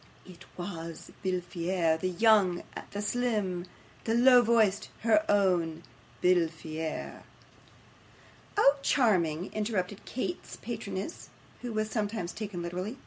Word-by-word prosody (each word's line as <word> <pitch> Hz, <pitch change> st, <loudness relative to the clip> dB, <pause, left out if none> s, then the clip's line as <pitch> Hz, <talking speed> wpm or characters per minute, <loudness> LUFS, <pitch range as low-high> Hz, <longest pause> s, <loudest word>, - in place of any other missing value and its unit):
It 180 Hz, -2 st, -13 dB
WAS 170 Hz, -2 st, -6 dB
from 190 Hz, -, 0 dB
Befillaire 175 Hz, -2 st, 0 dB
the 185 Hz, -, 0 dB
young, 195 Hz, -2 st, +4 dB, 0.3 s
the 205 Hz, +1 st, -4 dB
slim, 205 Hz, -6 st, -1 dB, 0.4 s
the 225 Hz, -, +1 dB
low 250 Hz, +1 st, +7 dB
voiced 220 Hz, -4 st, +2 dB
HER 235 Hz, +8 st, +4 dB
OWN 175 Hz, -5 st, +2 dB, 0.4 s
Befillaire.' 160 Hz, -3 st, 0 dB, 1.4 s
'Oh, 285 Hz, -8 st, +6 dB
charming!' 185 Hz, -, +2 dB
interrupted 205 Hz, -2 st, -2 dB
Kate's 345 Hz, +8 st, -4 dB
patroness, -, -, -5 dB, 0.3 s
who 245 Hz, -, -4 dB
was 215 Hz, 0 st, -1 dB
sometimes 210 Hz, -5 st, -2 dB
taken 200 Hz, -5 st, -5 dB
literary. 180 Hz, +8 st, -4 dB
190 Hz, 110 wpm, -30 LUFS, 175-220 Hz, 1.4 s, low